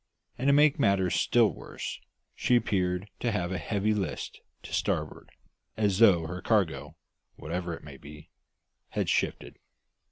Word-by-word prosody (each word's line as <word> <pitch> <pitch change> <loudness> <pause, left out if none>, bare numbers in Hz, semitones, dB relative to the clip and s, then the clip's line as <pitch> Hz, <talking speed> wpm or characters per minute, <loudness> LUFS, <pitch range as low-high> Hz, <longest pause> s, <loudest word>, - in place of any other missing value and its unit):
And, 130 - -2
to 140 - +6
make 145 0 +5
matters 100 -7 +2
still 115 -2 +4
worse, - - -7 0.3
she 125 - +2
appeared 95 -4 0
to 120 - 0
have 90 -4 -2
a 90 - -2
heavy 105 +6 0
list 100 -4 -4 0.2
to - - -9
starboard, - - -2 0.5
as 100 -3 +1
though 95 -8 +6
her 90 +2 -5
cargo, 80 -9 0 0.4
whatever 85 +2 -4
it - - -14
might 70 -3 -11
be, 75 +2 -12 0.6
had - - -1
shifted. - - -1
95 Hz, 150 wpm, -28 LUFS, 85-110 Hz, 0.6 s, to